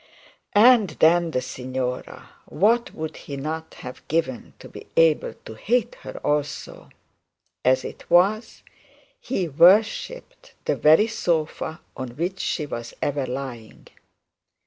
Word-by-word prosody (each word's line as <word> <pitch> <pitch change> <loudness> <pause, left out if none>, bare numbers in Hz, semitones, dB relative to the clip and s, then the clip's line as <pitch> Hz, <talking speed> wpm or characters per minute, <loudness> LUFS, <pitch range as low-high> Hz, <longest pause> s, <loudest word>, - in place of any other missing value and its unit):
And 220 -2 +6
then 170 +1 +4
the 130 -5 -1
signora; 130 0 -5 0.2
what 230 +4 +2
would 160 0 -6
he 140 - -8
not 160 +3 -5
have 125 -1 -9
given 150 -6 -2
to - - -12
be - - -12
able 165 -2 +3
to - - -8
hate 240 - 0
her - - -8
also? 150 0 -3 0.7
As 130 0 +2
it - - -9
was, 195 +6 +2 0.6
he 195 - -2
worshipped 210 - +2
the - - +1
very 155 +8 +5
sofa 160 -6 -2
on 125 -2 -7
which 180 +4 -3
she 155 - -2
was 120 -4 -7
ever 140 -2 -1
lying. 125 -4 -7
160 Hz, 125 wpm, -23 LUFS, 130-195 Hz, 0.7 s, And